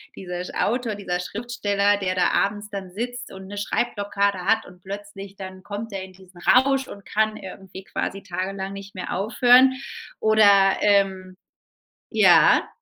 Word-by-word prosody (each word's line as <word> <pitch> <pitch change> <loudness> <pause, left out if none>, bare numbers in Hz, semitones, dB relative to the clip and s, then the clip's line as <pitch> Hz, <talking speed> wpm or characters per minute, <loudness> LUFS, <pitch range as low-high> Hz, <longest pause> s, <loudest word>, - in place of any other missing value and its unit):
dieser 180 -1 -6
sch - - -8
Autor, 235 -1 -1
dieser 180 -3 -3
Schriftsteller, 205 -1 0
der 185 -2 -2
da 180 -1 +2
abends 205 +1 -1
dann 195 -3 -7
sitzt 245 +5 -6
und 190 0 -10
'ne 205 +1 -8
Schreibblockade 200 -3 -1
hat 220 +3 +2
und 180 0 -16
plötzlich 200 0 -9
dann 190 -1 -9
kommt 210 +3 -6
der 195 -1 -5
in 190 - -12
diesen 185 -1 -17
Rausch 270 +4 +3
und 200 - -11
kann 215 0 0
irgendwie 190 -1 -10
quasi 195 +1 -4
tagelang 190 +1 -4
nicht 200 0 -10
mehr 185 - -5
aufhören. 245 +6 +5 0.5
Oder, 200 -3 +5
ähm 195 -2 +1 0.8
ja? - - +5
200 Hz, 155 wpm, -23 LUFS, 190-215 Hz, 0.8 s, aufhören